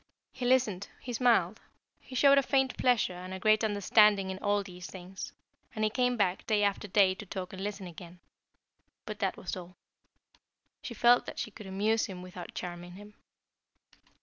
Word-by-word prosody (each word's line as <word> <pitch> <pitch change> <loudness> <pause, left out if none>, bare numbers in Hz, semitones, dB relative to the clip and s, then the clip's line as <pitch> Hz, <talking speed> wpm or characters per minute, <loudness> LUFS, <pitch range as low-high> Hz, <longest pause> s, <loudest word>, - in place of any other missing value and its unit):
He 250 -1 -4
listened, 220 -7 +2
he 245 - -6
smiled, 225 -5 +2 0.4
he 260 - -12
showed 280 +2 +6
a - - +3
faint 265 -1 +1
pleasure 245 -7 +2
and 185 +1 -7
a - - -7
great 215 +3 +3
understanding 205 -1 +4
in 190 - -6
all 205 0 +1
these 180 -1 -9
things, 185 0 -8 0.4
and 215 - -1
he 215 - +2
came 250 +1 +1
back 190 -3 +1
day 210 -1 +2
after 200 0 0
day 195 -1 +4
to 195 - -9
talk 190 -2 -6
and 190 0 -6
listen 205 -1 -4
again. 175 0 -11 0.9
But - - -6
that - - -1
was - - -5
all. 180 0 -10 1.1
She 235 - -7
felt 240 +3 +4
that - - -7
she 220 - -4
could 210 -1 -11
amuse 215 +4 +1
him 185 -3 -8
without 180 -1 -9
charming 175 0 -6
him. 205 +3 -12
205 Hz, 180 wpm, -30 LUFS, 185-225 Hz, 1.1 s, showed